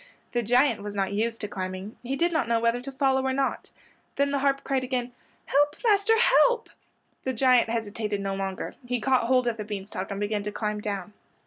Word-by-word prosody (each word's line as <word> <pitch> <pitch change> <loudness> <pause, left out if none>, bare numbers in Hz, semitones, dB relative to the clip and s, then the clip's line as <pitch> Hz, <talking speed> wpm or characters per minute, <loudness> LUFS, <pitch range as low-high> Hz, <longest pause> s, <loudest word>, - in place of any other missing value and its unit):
The 240 - +1
giant 240 0 +3
was 205 0 -6
not 195 0 -1
used 225 +2 -1
to 210 - -2
climbing. 185 +1 -5
He 255 +2 -3
did 340 +4 +1
not 275 -8 +1
know 230 0 +2
whether 230 +1 +1
to 275 +2 -7
follow 265 -1 +2
or 265 0 0
not. 270 0 -1 0.5
Then 280 0 +1
the 280 - +1
harp 275 0 +1
cried 270 -2 0
again, 250 -1 -2 0.3
"Help, 290 +1 +2
master, 435 0 +4
help!" 475 0 +4 0.5
The 260 - -1
giant 250 -1 +4
hesitated 215 -2 -2
no 195 0 -2
longer. 195 -1 -4
He 245 0 -2
caught 255 0 +2
hold 255 0 +3
of 235 -2 -1
the 210 - -4
bean 205 -2 -5
stalk 195 -1 -5
and 200 -1 -4
began 205 0 -1
to 210 +1 -4
climb 210 0 -3
down. 205 -1 -4
235 Hz, 215 wpm, -26 LUFS, 205-270 Hz, 0.5 s, master